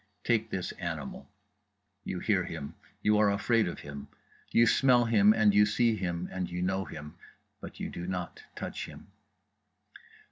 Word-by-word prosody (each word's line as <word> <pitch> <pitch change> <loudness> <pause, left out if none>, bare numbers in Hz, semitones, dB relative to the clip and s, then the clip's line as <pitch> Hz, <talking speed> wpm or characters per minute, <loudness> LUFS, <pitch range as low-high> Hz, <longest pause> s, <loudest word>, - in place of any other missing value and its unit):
Take 115 -2 +1
this 95 -3 -3
animal. 80 -3 -5 0.7
You 95 - -4
hear - - +1
him, 70 - -6 0.3
you 105 0 +4
are 105 -1 +5
afraid 110 +2 +2
of 85 - -5
him, 70 -1 -8 0.4
you 115 - +5
smell 125 +1 +4
and 105 -1 +5
you 105 +1 +6
see 115 +2 +2
him 90 -3 -3
and 95 -1 -3
you 90 0 -3
know 95 +1 0
him—but 75 -1 -12
you - - -3
do 85 +1 -6
not 90 -1 -4
touch - - -5
him. - - -13
95 Hz, 150 wpm, -30 LUFS, 85-110 Hz, 0.7 s, you